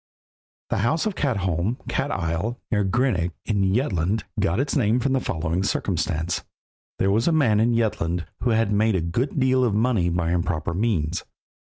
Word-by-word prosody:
The - - +1
house 155 - +1
of 215 - 0
Katholm 100 - -1
(Cat 140 - -1
isle) 90 - -2
near 105 -3 +2
Grenaac, 95 -4 +1
in 100 -3 +1
Jutland, 100 - 0 0.2
got 85 +7 +1
its 135 +1 0
name 120 -3 +2
from 135 +1 0
the 135 - +2
following 85 -4 -2
circumstance. 85 -3 -1 0.5
There 95 - +2
was 110 +3 +2
a - - +4
man 130 -10 +3
in 115 +2 +3
Jutland 90 -7 -1
who 125 - 0
had 110 -2 +2
made 105 +1 +2
a 90 - +1
good 115 - -1
deal 130 -1 +3
of 115 -5 +1
money 110 -6 +2
by 85 -1 0
improper 85 -2 -1
means. 90 -5 0
105 Hz, 175 wpm, -24 LUFS, 85-120 Hz, 0.5 s, a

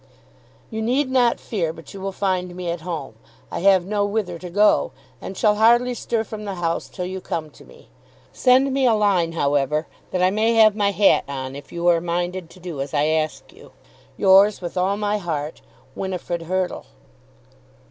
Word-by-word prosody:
You 220 0 -3
need 260 +4 0
not 245 -2 +3
fear 175 -8 -2
but 165 -2 -13
you 195 - -9
will 195 0 -3
find 185 -2 -2
me 180 -2 -3
at 170 -1 -5
home. 165 -8 -5 0.4
I - - -3
have 190 -1 +4
no 205 +1 0
whither 205 -4 -2
to 180 - -8
go, 205 +4 +3 0.3
and 190 - -7
shall 210 -1 +3
hardly 240 +3 +4
stir 230 -1 -2
from 215 -1 -8
the 200 -2 -4
house 170 -1 -2
till 180 - -5
you 185 +1 -5
come 155 -4 -4
to - - -17
me. - - -18 0.5
Send 260 +1 +3
me 270 -1 +2
a 230 - +4
line, 190 -6 +2
however, 145 0 0 0.2
that 180 -1 -1
I 185 - +4
may 220 +3 +1
have 215 -2 +6
my 205 -2 +2
hat 200 0 +3
on 135 -1 -5
if 140 0 -11
you 170 0 -4
are 170 -1 +4
minded 175 0 -3
to 185 - -16
do 170 -6 -6
as 140 +2 -4
I 150 +1 +2
ask 155 0 -2
you. - - -17 0.4
Yours 195 +2 +5
with 175 0 -6
all 190 +2 +1
my 210 0 -1
heart, 155 -4 -4 0.3
WINIFRID 180 -1 -4
HURTLE. 185 0 -2
185 Hz, 195 wpm, -22 LUFS, 170-210 Hz, 0.5 s, have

